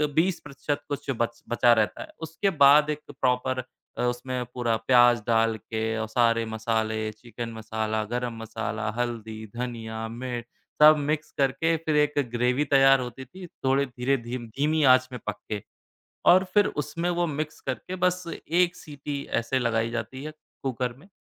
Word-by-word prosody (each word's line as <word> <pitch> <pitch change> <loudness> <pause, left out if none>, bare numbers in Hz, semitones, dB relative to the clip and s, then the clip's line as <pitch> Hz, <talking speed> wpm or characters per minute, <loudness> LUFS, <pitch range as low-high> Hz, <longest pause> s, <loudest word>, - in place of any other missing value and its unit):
20% 150 -4 -1
कुछ 145 0 -4
बच 115 0 -2
बचा 120 0 +5
रहता 110 -2 0
है। - - -7
उसके 165 +5 -1
बाद 150 +2 +7
एक 150 0 -1 0.2
प्रॉपर 130 0 +1 0.3
अ, - - -2
उसमें 125 +1 -2
पूरा 120 -2 0
प्याज़ 120 -1 +6
डाल 115 -1 +3
के 110 +1 -5 0.2
औ 110 - -1
सारे 115 0 +2
मसाले, 110 -1 -1
चिकन 115 +2 -7
मसाला, 110 0 -2
गरम 120 +2 -3
मसाला, 110 -1 -3
हल्दी, 110 -2 -3
धनिया, 115 -2 -4
मिर्च 120 +1 -5 0.4
सब 155 +1 +10
मिक्स 150 +2 -2
करके, 140 +5 +2
फिर 155 - +1
एक 150 0 +3 0.2
ग्रेवी 125 +4 +1
तैयार 135 -1 +6
होती 125 +1 -6
थी 185 +4 -11 0.2
थोड़े 135 +1 +3
धीरे 125 +2 0
धीम 120 0 -5
धीमी 150 +7 0
आँच 130 0 +3
में 125 - -6
पक 105 - -1 0.2
के 105 -1 -2 0.7
और 185 +2 +6
फिर 205 -1 +5 0.2
उसमें 170 +4 -3
वो 175 0 +1
मिक्स 155 0 -4
करके 135 +8 -4
बस 180 0 +2 0.3
एक 175 +2 +2
सीटी 145 -1 -6 0.2
ऐसे 130 +3 0
लगाई 115 -2 0
जाती 120 +3 -5
है, 155 - -5 0.3
कुकर 125 -2 -2
में। 160 - -17
125 Hz, 165 wpm, -26 LUFS, 115-145 Hz, 0.7 s, सब